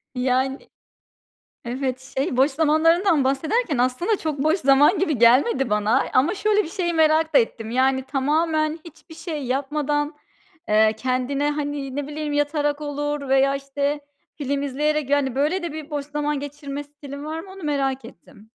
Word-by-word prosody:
Yani 260 Hz, +1 st, 0 dB, 1.1 s
Evet, 260 Hz, +1 st, -4 dB
şey, 265 Hz, -2 st, 0 dB
boş 275 Hz, +3 st, +4 dB
zamanlarından 320 Hz, +2 st, +3 dB
bahsederken 305 Hz, -, 0 dB
aslında, 255 Hz, -, +1 dB
çok 305 Hz, -3 st, -3 dB
boş 315 Hz, +4 st, +2 dB
zaman 280 Hz, +6 st, +4 dB
gibi 315 Hz, -9 st, 0 dB
gelmedi 255 Hz, -, +4 dB
bana. 210 Hz, +5 st, +2 dB
Ama 290 Hz, +10 st, +3 dB
şöyle 420 Hz, +1 st, +2 dB
bir 320 Hz, -, -7 dB
şeyi 345 Hz, -2 st, -2 dB
merak 315 Hz, 0 st, +3 dB
da -, -, +10 dB
ettim. 225 Hz, -, -3 dB
Yani, 260 Hz, +1 st, +2 dB
tamamen 310 Hz, +3 st, 0 dB
hiçbir 330 Hz, 0 st, -14 dB
şey 310 Hz, -5 st, -5 dB
yapmadan, 290 Hz, +3 st, -1 dB, 0.5 s
eee, 215 Hz, +1 st, +4 dB
kendine, 255 Hz, +4 st, -1 dB
hani, 290 Hz, -2 st, -4 dB
ne 285 Hz, -1 st, -3 dB
bileyim 300 Hz, 0 st, -4 dB
yatarak 290 Hz, 0 st, 0 dB
olur 290 Hz, -1 st, -3 dB
veya 270 Hz, +1 st, +3 dB
işte 280 Hz, +1 st, -2 dB, 0.4 s
film 280 Hz, -1 st, -2 dB
izleyerek. 295 Hz, +1 st, -1 dB
Yani 280 Hz, -3 st, +1 dB
böyle 305 Hz, +7 st, 0 dB
de 335 Hz, -3 st, -4 dB
bir, 310 Hz, -1 st, -7 dB
boş 290 Hz, -2 st, -3 dB
zaman 295 Hz, -1 st, -2 dB
geçirme 285 Hz, 0 st, -6 dB
stilin 285 Hz, 0 st, -10 dB
var 315 Hz, +1 st, -4 dB
mı? 380 Hz, +3 st, -10 dB
Onu 385 Hz, -1 st, -11 dB
merak 270 Hz, -4 st, -1 dB
ettim. 210 Hz, +1 st, -16 dB
290 Hz, 160 wpm, -23 LUFS, 270-310 Hz, 1.1 s, da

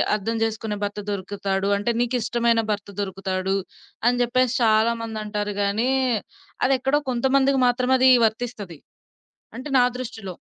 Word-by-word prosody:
అర్థం 220 Hz, +2 st, -3 dB
చేసుకునే 220 Hz, -1 st, -2 dB
భర్త 205 Hz, +1 st, -3 dB
దొరుకుతాడు. 195 Hz, 0 st, -2 dB
అంటె, 205 Hz, +4 st, -1 dB
నీకిష్టమైన 235 Hz, -1 st, +1 dB
భర్త 205 Hz, -1 st, -4 dB
దొరుకుతాడు, 190 Hz, -1 st, -2 dB, 0.5 s
అని 245 Hz, 0 st, +2 dB
జెప్పేసి 250 Hz, +1 st, +1 dB
చాలామందంటారు 215 Hz, -2 st, 0 dB
గాని 210 Hz, +5 st, 0 dB, 0.8 s
అదెక్కడో 270 Hz, +2 st, +2 dB
కొంతమందికి 265 Hz, +2 st, +2 dB
మాత్రమది 255 Hz, +1 st, +3 dB, 0.2 s
వర్తిస్తది. 220 Hz, -7 st, -4 dB, 0.8 s
అంటె, 260 Hz, +4 st, -7 dB
నా 245 Hz, -, +5 dB
దృష్టిలో. 220 Hz, -7 st, -6 dB
225 Hz, 110 wpm, -23 LUFS, 205-250 Hz, 0.8 s, నా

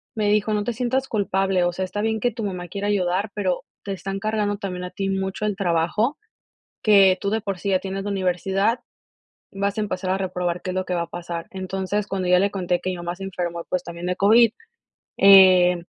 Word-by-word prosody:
me 210 Hz, -2 st, +1 dB
dijo: 210 Hz, +1 st, +2 dB
"No 210 Hz, -1 st, 0 dB
te 240 Hz, -, -2 dB
sientas 255 Hz, +3 st, -1 dB
culpable, 195 Hz, -4 st, +1 dB
o 175 Hz, -, 0 dB
sea, 190 Hz, -, -3 dB
está 205 Hz, +3 st, -4 dB
bien 220 Hz, 0 st, 0 dB
que 245 Hz, +2 st, +1 dB
tu 225 Hz, 0 st, -6 dB
mamá 180 Hz, -3 st, -4 dB
quiera 200 Hz, +2 st, -3 dB
ayudar, 195 Hz, 0 st, 0 dB
pero 190 Hz, -4 st, -1 dB, 0.2 s
te 200 Hz, -, -4 dB
están 195 Hz, +1 st, -5 dB
cargando 210 Hz, -1 st, -1 dB
también 185 Hz, -3 st, -5 dB
a 180 Hz, -, -7 dB
ti 195 Hz, -1 st, -3 dB
mucho 190 Hz, +2 st, -2 dB
el 210 Hz, -1 st, -1 dB
trabajo, 185 Hz, -, 0 dB, 0.7 s
que 195 Hz, -3 st, +6 dB
tú 200 Hz, -, -2 dB
de 220 Hz, +1 st, 0 dB
por 195 Hz, -2 st, -3 dB
sí 200 Hz, -, -4 dB
ya 190 Hz, -, +3 dB
tienes 195 Hz, 0 st, -5 dB
la 205 Hz, -, -3 dB
universidad, 195 Hz, +4 st, 0 dB, 0.7 s
vas 200 Hz, +1 st, -2 dB
a -, -, +1 dB
empezar 185 Hz, -3 st, -2 dB
a 190 Hz, -, +1 dB
reprobar 180 Hz, -2 st, -2 dB
qué -, -, -5 dB
es -, -, -5 dB
lo 185 Hz, 0 st, -1 dB
que 180 Hz, -, -3 dB
va 170 Hz, -1 st, 0 dB
a -, -, -8 dB
pasar". 170 Hz, -1 st, -6 dB
Entonces, 190 Hz, +1 st, -3 dB
cuando 190 Hz, -2 st, -2 dB
ya 180 Hz, 0 st, +5 dB
le 200 Hz, +1 st, +1 dB
conté 180 Hz, -3 st, -1 dB
que 185 Hz, -, -2 dB
mi 180 Hz, -, -5 dB
mamá 175 Hz, 0 st, -4 dB
se 195 Hz, -, -9 dB
enfermó, 175 Hz, -3 st, -4 dB
pues, 180 Hz, -1 st, -1 dB
también 170 Hz, 0 st, -7 dB
de 180 Hz, -, 0 dB
COVID, 220 Hz, +4 st, +5 dB, 0.7 s
eh, 185 Hz, -2 st, +7 dB
195 Hz, 230 wpm, -23 LUFS, 180-205 Hz, 0.7 s, eh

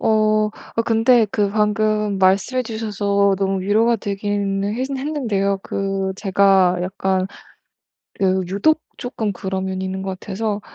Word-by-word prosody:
어 215 Hz, -1 st, +2 dB, 0.3 s
아 230 Hz, -, +3 dB
근데 225 Hz, 0 st, +4 dB
그 205 Hz, -2 st, 0 dB
방금 210 Hz, -1 st, +1 dB
말씀해 195 Hz, +7 st, +2 dB
주셔서 205 Hz, -3 st, 0 dB
너무 195 Hz, -1 st, 0 dB
위로가 220 Hz, +4 st, +2 dB
되기는 200 Hz, 0 st, -2 dB
했 260 Hz, +3 st, -2 dB
했는데요 245 Hz, -9 st, -1 dB
그 195 Hz, -1 st, -2 dB
제가 190 Hz, -2 st, +3 dB
약간 190 Hz, 0 st, -1 dB, 0.9 s
그 190 Hz, -1 st, +2 dB
유독 210 Hz, -, +2 dB, 0.2 s
쪼끔 225 Hz, -4 st, -3 dB
그런 190 Hz, 0 st, -3 dB
면이 190 Hz, 0 st, -3 dB
있는 190 Hz, 0 st, -4 dB
것 190 Hz, -1 st, -5 dB
같아서 210 Hz, +1 st, -3 dB
200 Hz, 255 characters per minute, -20 LUFS, 190-220 Hz, 0.9 s, 근데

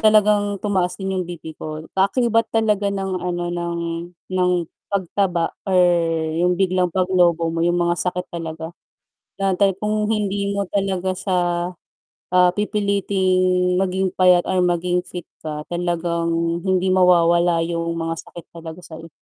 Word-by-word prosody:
talagang 210 Hz, -2 st, +4 dB
tumaas 185 Hz, -3 st, 0 dB
din 190 Hz, -1 st, -3 dB
'yong 185 Hz, -1 st, -1 dB
BP 160 Hz, -2 st, -8 dB
ko. 155 Hz, 0 st, -6 dB
Kaakibat 230 Hz, +3 st, +2 dB
talaga 210 Hz, -2 st, +2 dB
ng 195 Hz, -1 st, -3 dB
ano, 175 Hz, -1 st, -2 dB
ng 170 Hz, -1 st, -3 dB, 0.5 s
ng 180 Hz, -1 st, +2 dB, 0.4 s
pagtaba 185 Hz, -3 st, 0 dB, 0.2 s
or 190 Hz, -, +2 dB, 0.6 s
'yong 180 Hz, 0 st, +2 dB
biglang 185 Hz, -1 st, +1 dB
paglobo 175 Hz, -2 st, +2 dB
mo 165 Hz, -, -2 dB
'yong 175 Hz, +1 st, +2 dB
mga 175 Hz, 0 st, +1 dB
sakit 180 Hz, 0 st, -3 dB
talaga. 160 Hz, -1 st, -6 dB, 0.7 s
Na 195 Hz, -1 st, +1 dB
tay 195 Hz, +1 st, +3 dB
kung 210 Hz, 0 st, 0 dB
hindi 200 Hz, -1 st, -1 dB
mo 200 Hz, -, 0 dB
talaga 190 Hz, -2 st, 0 dB
siya, 185 Hz, 0 st, -1 dB, 1.0 s
ah, 180 Hz, 0 st, +6 dB
pipiliting 185 Hz, -3 st, +1 dB
maging 190 Hz, 0 st, 0 dB
payat 180 Hz, -1 st, +4 dB
or 185 Hz, -1 st, 0 dB
maging 180 Hz, 0 st, +1 dB
fit 175 Hz, 0 st, -4 dB, 0.2 s
ka, 150 Hz, -1 st, -5 dB
talagang 170 Hz, -1 st, -1 dB
hindi 185 Hz, 0 st, +2 dB
mawawala 175 Hz, -2 st, +4 dB
'yong 170 Hz, 0 st, -2 dB
mga 165 Hz, 0 st, -2 dB
sakit 170 Hz, -, -11 dB
talaga 165 Hz, +1 st, -9 dB
sa'yo. 165 Hz, 0 st, -10 dB
180 Hz, 140 wpm, -21 LUFS, 170-195 Hz, 1.0 s, ah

